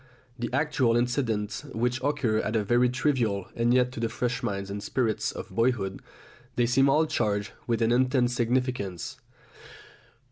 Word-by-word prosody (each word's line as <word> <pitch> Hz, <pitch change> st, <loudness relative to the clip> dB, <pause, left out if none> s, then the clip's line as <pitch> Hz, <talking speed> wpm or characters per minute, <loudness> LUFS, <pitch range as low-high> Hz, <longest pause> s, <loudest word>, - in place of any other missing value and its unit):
The 120 Hz, -1 st, -2 dB
actual 130 Hz, -4 st, +2 dB
incidents 115 Hz, -3 st, -1 dB
which 120 Hz, +2 st, 0 dB
occur 130 Hz, -6 st, +1 dB
are 110 Hz, 0 st, 0 dB
very 120 Hz, +4 st, +3 dB
trivial, 120 Hz, -7 st, 0 dB
and 115 Hz, +1 st, +2 dB
yet 125 Hz, 0 st, +3 dB
to 125 Hz, -, -7 dB
the 115 Hz, 0 st, 0 dB
fresh 125 Hz, +2 st, -2 dB
minds 100 Hz, -5 st, -3 dB
and 100 Hz, +1 st, -4 dB
spirits 110 Hz, +1 st, -1 dB
of -, -, -8 dB
boyhood 115 Hz, -5 st, 0 dB, 0.5 s
they 120 Hz, -, +3 dB
seem 135 Hz, +3 st, +4 dB
all 155 Hz, +3 st, +4 dB
charged 105 Hz, -8 st, -1 dB, 0.2 s
with 115 Hz, -1 st, +1 dB
an 115 Hz, -, +2 dB
intense 125 Hz, 0 st, +2 dB
significance. 125 Hz, -2 st, -1 dB
120 Hz, 150 wpm, -27 LUFS, 110-125 Hz, 0.5 s, seem